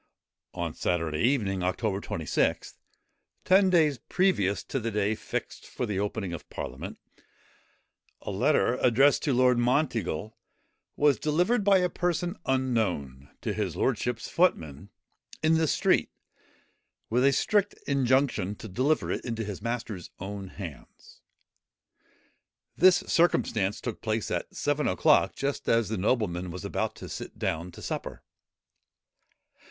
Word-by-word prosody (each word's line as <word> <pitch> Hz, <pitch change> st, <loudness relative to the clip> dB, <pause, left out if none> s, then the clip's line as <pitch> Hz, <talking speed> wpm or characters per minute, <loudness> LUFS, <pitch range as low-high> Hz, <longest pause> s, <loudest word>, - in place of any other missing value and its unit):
On -, -, -3 dB
Saturday 80 Hz, -3 st, -1 dB
evening, 105 Hz, -, +1 dB
October 95 Hz, +2 st, -1 dB
26, 80 Hz, -6 st, -1 dB, 0.7 s
ten 190 Hz, +1 st, +5 dB
days 155 Hz, -7 st, +3 dB
previous 105 Hz, -, +1 dB
to 135 Hz, -, -3 dB
the 115 Hz, -1 st, -2 dB
day 105 Hz, 0 st, 0 dB
fixed -, -, -5 dB
for -, -, -3 dB
the 105 Hz, -4 st, -2 dB
opening 100 Hz, -2 st, -3 dB
of 85 Hz, -, -8 dB
parliament, -, -, -6 dB, 1.3 s
a -, -, -4 dB
letter, 120 Hz, +6 st, +2 dB
addressed 135 Hz, +4 st, +4 dB
to 145 Hz, -, 0 dB
Lord 125 Hz, -1 st, +4 dB
Monteagle, 115 Hz, -, 0 dB, 0.6 s
was 145 Hz, -2 st, +3 dB
delivered, 180 Hz, +9 st, +1 dB
by 195 Hz, -1 st, +5 dB
a 180 Hz, -1 st, +2 dB
person 175 Hz, 0 st, -1 dB
unknown, 105 Hz, -, -1 dB
to -, -, -2 dB
his -, -, -2 dB
lordship's 120 Hz, -2 st, -1 dB
footman, 95 Hz, -, 0 dB, 0.5 s
in 160 Hz, +1 st, +4 dB
the 160 Hz, 0 st, +3 dB
street, -, -, +2 dB, 1.0 s
with 125 Hz, +2 st, +3 dB
a 140 Hz, -, +5 dB
strict 205 Hz, +8 st, +1 dB
injunction 130 Hz, -7 st, +1 dB
to 110 Hz, -, -9 dB
deliver 130 Hz, +10 st, 0 dB
it -, -, -3 dB
into 115 Hz, -2 st, -3 dB
his 105 Hz, -3 st, -6 dB
master's 115 Hz, -6 st, -4 dB
own 100 Hz, +1 st, -6 dB
hands. 90 Hz, -, -11 dB, 1.5 s
This 185 Hz, +1 st, +5 dB
circumstance 110 Hz, -, +1 dB
took 120 Hz, -4 st, -5 dB
place 110 Hz, -1 st, -2 dB
at -, -, -3 dB
seven 145 Hz, +1 st, 0 dB
o'clock, 150 Hz, -2 st, +3 dB
just 140 Hz, 0 st, -2 dB
as 115 Hz, -2 st, +3 dB
the 110 Hz, -, -2 dB
nobleman 90 Hz, -5 st, 0 dB
was 90 Hz, +1 st, -7 dB
about -, -, -2 dB
to -, -, -9 dB
sit -, -, -7 dB
down 85 Hz, +3 st, -2 dB
to -, -, -11 dB
supper. -, -, -5 dB
115 Hz, 135 wpm, -28 LUFS, 95-145 Hz, 1.5 s, ten